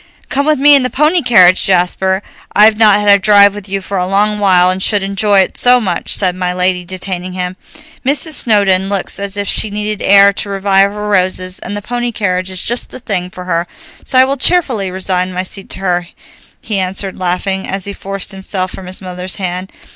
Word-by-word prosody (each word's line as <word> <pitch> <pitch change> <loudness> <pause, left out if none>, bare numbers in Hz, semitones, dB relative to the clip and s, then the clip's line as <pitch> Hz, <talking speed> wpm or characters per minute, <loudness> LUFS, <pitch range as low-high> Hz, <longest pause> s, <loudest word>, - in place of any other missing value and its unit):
"Come 280 +2 -1
with 305 -1 +2
me 290 +2 +5
in 275 - +4
the 255 - -2
pony 305 +6 +1
carriage, 185 - +4
Jasper. 190 +1 0 0.3
I've 215 +1 +5
not 210 -2 +4
had 205 - -3
a 200 0 +6
drive 200 0 +5
with 205 -1 -9
you 195 0 -3
for 195 0 -4
a 180 - -2
long 210 +2 +1
while, 185 -3 +3
and 185 +1 -4
should 205 0 +1
enjoy 200 0 +2
it 185 - -3
so 250 0 +4
much," 185 -7 -1
said 185 -3 0
my 180 -1 -2
lady, 180 0 0
detaining 185 0 -5
him. 180 0 -4 0.5
"Mrs. 280 +4 +2
Snowdon 200 -8 +3
looks 200 -1 -2
as 200 0 -5
if 200 0 -3
she 215 - +2
needed 210 0 -4
air 200 0 +5
to 200 - -3
revive 195 0 +1
her 210 0 -6
roses, 185 -2 0
and 205 - -6
the 205 - -8
pony 240 +1 -3
carriage 185 -4 -2
is 185 -1 -2
just 240 +2 -1
the - - -10
thing 190 -7 -4
for 180 0 -10
her, 170 -1 -2 0.4
so 255 - -1
I 255 - +7
will 275 +1 -2
cheerfully 255 - +1
resign 185 0 -2
my 185 +1 -3
seat 195 +1 -8
to - - -5
her," 175 -2 -1 0.5
he 210 -3 -3
answered 190 +1 -2
laughing, 185 +1 -2
as 195 -1 -3
he 200 - -6
forced 195 0 -5
himself 190 -1 -4
from 185 - -9
his 185 +1 -5
mother's 180 0 -5
hand. 185 0 -5
195 Hz, 215 wpm, -13 LUFS, 185-210 Hz, 0.5 s, I